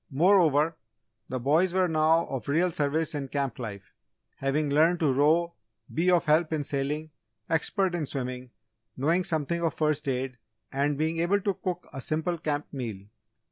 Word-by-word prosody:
Moreover, 160 -1 +3 0.5
the 130 - -2
boys 160 +8 +2
were 185 -1 +3
now 160 +1 +3
of 130 -2 -5
real 170 +5 +2
service 155 +1 0
in 140 -2 -3
camp 135 -3 -3
life, 100 -5 -7 0.4
having 140 +3 0
learned 165 +4 +4
to 145 -4 +3
row, 160 +5 +3 0.4
be 175 +3 +2
of 175 -1 +3
help 155 +1 +3
in 155 -2 -1
sailing, 145 +2 -2 0.4
expert 180 +3 +1
in 165 -4 -2
swimming, 125 -2 -5 0.5
knowing 165 +7 +2
something 170 +1 -1
of 165 -1 0
first 150 -1 0
aid, 130 -1 -2 0.3
and 140 +1 0
being 160 +2 -1
able 190 +4 +2
to 200 0 0
cook 180 -1 -5
a 135 - -5
simple 160 +4 -1
camp 150 -2 -2
meal. 120 -7 -4
155 Hz, 165 wpm, -27 LUFS, 140-170 Hz, 0.5 s, learned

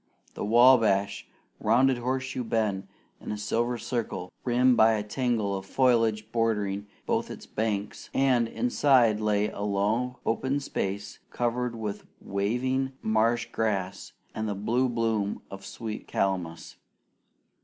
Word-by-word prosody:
The - - -5
Wabash 110 -3 +4 0.3
rounded 125 +3 +3
Horseshoe 130 +1 -2
Bend 110 -4 -1 0.3
in - - -6
a 105 - -3
silver 120 +3 -1
circle, 115 -7 -4
rimmed 125 +1 +4
by 110 0 +5
a 105 -1 -1
tangle 110 -3 -1
of 95 - -4
foliage 115 -3 +2
bordering 105 -3 0 0.2
both - - 0
its - - -8
banks; 105 -2 -3
and 130 -4 +3
inside 130 - +3
lay 105 -1 +1
a - - -7
low 105 +5 0
open 130 +5 0
space 100 -6 -4
covered 120 0 -1
with 105 -3 -5
waving 130 +7 -1
marsh 115 +2 +1
grass 100 -4 -2 0.2
and 110 0 -3
the 100 - -2
blue 120 +6 +1
bloom 115 -4 -1
of 95 0 -8
sweet 110 +2 -6
calamus. 90 -4 -2
110 Hz, 130 wpm, -27 LUFS, 105-125 Hz, 0.3 s, by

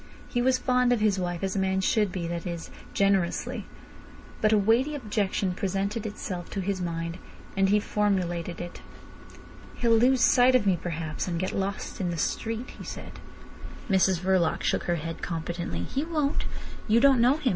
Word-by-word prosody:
He 245 - -1
was 255 +1 +3
fond 250 -1 +2
of 245 - +3
his 210 -2 +2
wife 175 0 -3
as 190 0 -1
a - - +1
man 190 0 +1
should 205 +1 +2
be—that 170 -1 -3
is, 170 -1 -5 0.2
generously. 195 -3 0 0.7
But 215 - +4
a 215 - +5
weighty 230 +9 +2
objection 205 -6 -1
presented 200 +4 -2
itself 185 -4 -5
to 200 - -4
his 190 0 -2
mind, 170 0 -3 0.4
and 195 0 +3
he 210 +1 +4
formulated 180 -5 -1
it. 175 0 -7 0.9
"He'll 230 -1 +3
lose 250 +2 +4
sight 255 +1 +5
of 240 -5 +3
me 190 -2 +4
perhaps, 160 -2 -3
and 170 -2 -2
get 185 - -1
lost 195 +1 -3
in 180 - 0
the 170 - -3
street," 225 +9 -2
he - - -7
said. - - -8 0.7
Mrs 190 -2 +3
Verloc 185 -3 +2
shook - - 0
her 175 - +1
head 165 0 -5
competently. 170 +1 -3
"He 275 - -2
won't. 305 -3 -1 0.4
You 225 +1 +5
don't 270 -1 +5
know 255 +5 +5
him. 290 -5 0
195 Hz, 180 wpm, -27 LUFS, 175-230 Hz, 0.9 s, a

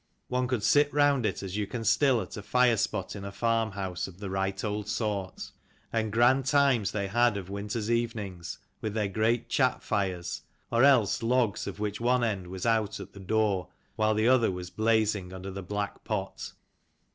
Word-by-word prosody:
One 125 0 0
could 120 -4 -1
sit 145 +7 +4
round 145 -5 +3
it, - - -3
as 95 +1 -4
you 105 -1 -1
can 115 +2 -5
still 115 +3 +3
at 90 - -10
a 105 - -6
fire 125 +3 +3
spot 105 -3 -2
in 100 - -7
a 100 - -5
farm 115 0 0
house 95 -2 -3
of 95 -2 -12
the 100 -1 -6
right 95 0 -2
old 105 0 -2
sort. 105 -4 -3 0.4
And 110 -2 0
grand 120 +4 +4
times 140 -8 +3
they 100 -2 -2
had 120 +1 +2
of 95 -1 -7
winter's 105 +2 -3
evenings 100 - -2 0.2
with 110 -1 -3
their 105 -2 +1
great 110 +4 0
chat 130 -3 +1
fires, 90 -4 -2 0.3
or 120 +2 +3
else 130 -8 +4
logs 115 -2 +1
of - - -6
which 105 +1 -3
one 125 +1 +2
end 100 -6 -1
was 95 +2 -6
out 110 -3 +1
at - - -9
the 100 - -11
door 100 -1 0 0.3
while 110 -1 +2
the 110 +2 +2
other 125 -2 +4
was 90 -1 -5
blazing 110 -4 +1
under 95 +1 -6
the 95 +1 -6
black 100 +2 -4
pot. 95 -3 -4
110 Hz, 195 wpm, -28 LUFS, 100-120 Hz, 0.4 s, sit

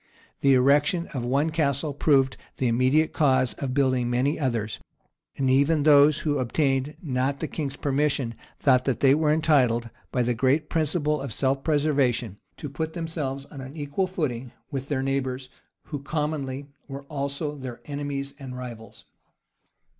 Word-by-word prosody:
The 135 -1 +5
erection 145 +7 +3
of 130 -4 -3
one 140 +6 +1
castle 145 -1 0
proved 135 -2 +3 0.2
the 130 - +1
immediate 130 +7 +2
cause 130 -4 +3
of 130 -2 -3
building 130 -3 +2
many 130 +6 +1
others; 115 -7 -2 0.6
and 135 - 0
even 140 +4 +3
those 150 0 +6
who 145 -3 0
obtained 135 +2 0
not 135 -1 -1
the 160 - -2
king's 140 -1 -4
permission, 140 -3 0 0.3
thought 130 -2 +3
that 135 - -1
they 135 -1 +6
were 150 0 +2
entitled, 130 -7 +2 0.2
by 125 - +1
the 120 +1 +1
great 135 +6 +1
principle 150 -2 +1
of 135 -3 -5
self 135 +4 0
preservation, 140 - +1 0.2
to 150 - -6
put 160 +3 -4
themselves 155 -5 -4
on 135 - -8
an 135 +4 -9
equal 145 +6 -1
footing 130 -9 -3 0.2
with 135 -1 -4
their 135 -3 -1
neighbors, 130 -1 -2 0.3
who 145 -3 -6
commonly 145 -2 -3 0.2
were 140 -1 -7
also 140 +1 -3
their 130 -4 -7
enemies 140 -1 -4
and 130 -2 -7
rivals. 115 -4 -9
140 Hz, 155 wpm, -25 LUFS, 130-150 Hz, 0.6 s, those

